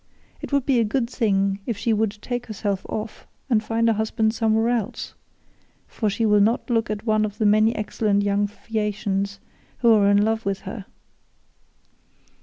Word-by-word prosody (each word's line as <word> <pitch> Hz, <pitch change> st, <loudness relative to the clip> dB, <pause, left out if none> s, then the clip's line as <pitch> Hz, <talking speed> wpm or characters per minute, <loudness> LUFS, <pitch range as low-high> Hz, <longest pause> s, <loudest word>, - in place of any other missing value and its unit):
It -, -, -7 dB
would 280 Hz, -2 st, +1 dB
be 265 Hz, -4 st, +3 dB
a -, -, +4 dB
good 230 Hz, +3 st, 0 dB
thing 195 Hz, -4 st, +1 dB
if 235 Hz, -4 st, -2 dB
she 225 Hz, +1 st, 0 dB
would 215 Hz, 0 st, 0 dB
take 245 Hz, -1 st, -4 dB
herself 205 Hz, -3 st, -3 dB
off 215 Hz, 0 st, -6 dB, 0.2 s
and 220 Hz, -2 st, +3 dB
find 230 Hz, +1 st, 0 dB
a 225 Hz, -, +4 dB
husband 220 Hz, 0 st, 0 dB
somewhere 225 Hz, 0 st, +1 dB
else, 230 Hz, -4 st, -2 dB, 0.7 s
for 215 Hz, -, -2 dB
she 225 Hz, +3 st, -1 dB
will 210 Hz, -1 st, +4 dB
not 230 Hz, +4 st, +1 dB
look 225 Hz, -2 st, +1 dB
at 215 Hz, +1 st, -4 dB
one 215 Hz, -1 st, +2 dB
of 210 Hz, -1 st, -3 dB
the 220 Hz, -, 0 dB
many 215 Hz, +2 st, +4 dB
excellent 210 Hz, -1 st, 0 dB
young 205 Hz, 0 st, +1 dB
Phaeacians 205 Hz, -2 st, -3 dB, 0.4 s
who 235 Hz, -2 st, +6 dB
are 205 Hz, -2 st, +4 dB
in 205 Hz, 0 st, +4 dB
love 225 Hz, 0 st, 0 dB
with 195 Hz, -1 st, -2 dB
her. 200 Hz, -4 st, -8 dB
215 Hz, 180 wpm, -23 LUFS, 205-225 Hz, 0.7 s, who